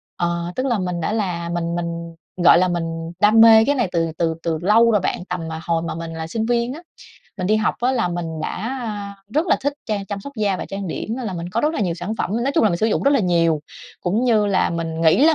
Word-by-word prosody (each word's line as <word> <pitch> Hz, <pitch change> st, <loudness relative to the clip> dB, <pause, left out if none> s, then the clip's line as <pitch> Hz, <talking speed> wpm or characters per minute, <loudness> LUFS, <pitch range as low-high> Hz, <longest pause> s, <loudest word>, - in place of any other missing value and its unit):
Ờ, 170 Hz, 0 st, -2 dB
tức 255 Hz, -, -1 dB
là 240 Hz, -5 st, +1 dB
mình 180 Hz, -2 st, -2 dB
đã 165 Hz, -, -1 dB
là 180 Hz, -6 st, -2 dB
mình 170 Hz, 0 st, -2 dB
mình, 170 Hz, -1 st, -4 dB, 0.3 s
gọi 175 Hz, -, +8 dB
là, 185 Hz, -, +3 dB
mình 165 Hz, -1 st, -3 dB
đam 215 Hz, +2 st, +6 dB
mê 225 Hz, -1 st, +8 dB
cái 285 Hz, -, +2 dB
này 245 Hz, -7 st, +1 dB
từ 165 Hz, -1 st, 0 dB
từ 165 Hz, -1 st, +1 dB
từ 165 Hz, -2 st, 0 dB
lâu 225 Hz, +5 st, +5 dB
rồi 210 Hz, -, +3 dB
bạn, 180 Hz, -, -2 dB
tầm 180 Hz, -2 st, -3 dB
mà 160 Hz, 0 st, -5 dB
hồi 165 Hz, -1 st, 0 dB
mà 165 Hz, -, -4 dB
mình 165 Hz, 0 st, -6 dB
là 160 Hz, 0 st, -5 dB
sinh 220 Hz, +6 st, -2 dB
viên 240 Hz, +1 st, 0 dB
á. 315 Hz, -, -9 dB, 0.6 s
Mình 185 Hz, -3 st, -2 dB
đi 215 Hz, -, +3 dB
học 215 Hz, 0 st, +1 dB
á 250 Hz, +2 st, +2 dB
là 235 Hz, -8 st, +1 dB
mình 175 Hz, -1 st, -3 dB, 0.2 s
đã 235 Hz, +11 st, -3 dB, 0.6 s
rất 310 Hz, +4 st, +2 dB
là -, -, +3 dB
thích 285 Hz, +1 st, 0 dB
trang 205 Hz, -3 st, -2 dB
chăm 200 Hz, 0 st, -4 dB
sóc 280 Hz, -, -9 dB
da 205 Hz, -3 st, +1 dB
và -, -, -5 dB
trang 195 Hz, 0 st, -5 dB
điểm 220 Hz, +7 st, -4 dB
nên 255 Hz, -3 st, -4 dB
là 195 Hz, -, -3 dB
mình 170 Hz, 0 st, -5 dB
có 215 Hz, +6 st, -1 dB
rất 305 Hz, +4 st, +1 dB
là -, -, -2 dB
nhiều 175 Hz, -5 st, 0 dB
sản 180 Hz, +5 st, -4 dB
phẩm, -, -, -1 dB
nói 275 Hz, +3 st, 0 dB
chung -, -, +4 dB
là 215 Hz, -, +4 dB
mình 170 Hz, -, 0 dB
sử 215 Hz, -, +1 dB
dụng 225 Hz, -, 0 dB
rất 280 Hz, -, +4 dB
là 280 Hz, -, +3 dB
nhiều. 165 Hz, -4 st, +2 dB, 0.4 s
Cũng 205 Hz, +7 st, 0 dB
như 220 Hz, -4 st, +3 dB
là 195 Hz, -2 st, +2 dB
mình 165 Hz, -1 st, -3 dB
nghĩ 165 Hz, -, +5 dB
là 325 Hz, -, +5 dB
185 Hz, 280 wpm, -21 LUFS, 170-225 Hz, 0.6 s, gọi